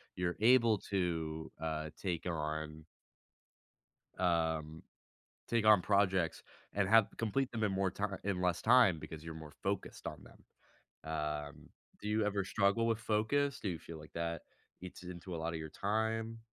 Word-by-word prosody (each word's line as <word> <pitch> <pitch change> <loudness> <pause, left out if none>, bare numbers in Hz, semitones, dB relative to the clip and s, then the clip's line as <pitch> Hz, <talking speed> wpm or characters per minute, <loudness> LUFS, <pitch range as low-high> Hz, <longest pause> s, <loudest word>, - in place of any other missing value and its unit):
You're 90 -1 -1
able 115 -1 +6
to, 80 -4 -1
uh, 80 -1 -2
take 90 -4 -2
on 80 -1 -3 1.4
um, 80 -3 0 0.7
take 115 -2 +2
on 105 -3 +8
projects, 95 -3 +2 0.3
and 100 -1 +2
have 110 -2 +7
complete 125 +4 0
them 110 -2 0
in 105 - +1
more 95 0 +1
ti 100 - -3 0.2
in 100 -2 0
less 90 -2 +1
time, 115 -8 +6
because 80 0 -8
you're 80 -1 -6
more 80 -1 -9
focused - - -3
on - - -6
them, - - -17 0.7
um, 75 -1 -4 0.3
do 105 - -5
you 105 0 +2
ever 100 -1 0
struggle 100 +4 +2
with 115 -1 +2
focus? 115 +6 +1
Do - - -2
you 85 - -2
feel 80 0 -9
like 75 - -13
that 85 -1 -2 0.4
eats 90 0 -9
into 90 0 -7
a - - -3
lot 80 +1 -2
of 80 - -3
your 80 0 -6
time? 110 +5 -1
90 Hz, 165 wpm, -35 LUFS, 80-110 Hz, 1.4 s, on